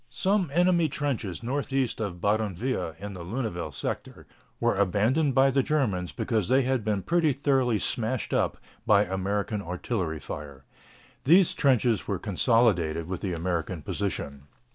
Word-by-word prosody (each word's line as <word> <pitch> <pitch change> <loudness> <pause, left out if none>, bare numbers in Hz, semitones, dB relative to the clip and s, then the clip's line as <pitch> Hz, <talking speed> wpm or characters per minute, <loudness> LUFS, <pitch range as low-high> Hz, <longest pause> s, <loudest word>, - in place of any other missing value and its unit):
Some 190 +3 +1
enemy 175 0 +3
trenches 125 - -3
northeast 135 0 -1
of 95 -5 -4
Badonviller, 100 -2 -1
in 100 +2 -7
the 90 -2 -7
Lunéville 90 - -3
sector, - - -5 0.3
were 120 -2 +2
abandoned 110 - +2
by 135 0 +5
the 135 +1 +3
Germans 120 - 0
because 110 -6 -1
they 130 +3 +4
had 130 -2 0
been 100 -2 -1
pretty 165 -4 +2
thoroughly 130 -4 +1
smashed 115 +5 -1
up - - +1 0.3
by 105 -2 +5
American 100 +2 -2
artillery 90 -2 -3
fire. 70 -2 -8 0.6
These 175 +5 +5
trenches 125 -5 +2
were 100 - -1
consolidated 90 -6 +1
with 90 -1 -4
the 95 -3 -2
American 85 -1 -2
position. 70 -9 -4
105 Hz, 140 wpm, -27 LUFS, 90-135 Hz, 0.6 s, by